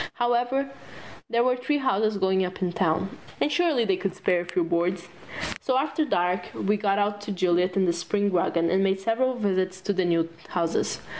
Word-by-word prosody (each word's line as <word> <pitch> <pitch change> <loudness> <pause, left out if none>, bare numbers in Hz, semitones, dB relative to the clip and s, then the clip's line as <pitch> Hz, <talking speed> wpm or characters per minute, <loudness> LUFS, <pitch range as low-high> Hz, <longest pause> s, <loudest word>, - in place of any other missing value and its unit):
However, 245 +3 0 0.6
there 235 0 +2
were 250 0 +3
three 260 +4 0
houses 220 -6 +1
going 190 0 +2
up 180 0 -4
in 175 -1 -1
town 185 -1 +1 0.3
and 295 - +1
surely 300 -7 +2
they 195 -3 +1
could 195 -2 -3
spare 180 -2 +1
a - - -7
few 175 +1 0
boards. 170 +1 -1 0.5
So 260 -1 +1
after 295 +3 0
dark 180 -6 0
we 205 +2 +1
got 200 -1 +1
out 205 0 -1
old 200 - -4
Juliet 180 0 +2
and 190 -1 +3
the 170 - +3
spring 200 +4 -1
wagon 170 -2 +1
and 190 +1 +3
made 195 0 +1
several 240 +6 +1
visits 185 -4 -1
to 205 +2 -1
the 190 -1 +1
new 165 -1 +2 0.2
houses. 170 -2 -1
195 Hz, 200 wpm, -26 LUFS, 180-240 Hz, 0.6 s, were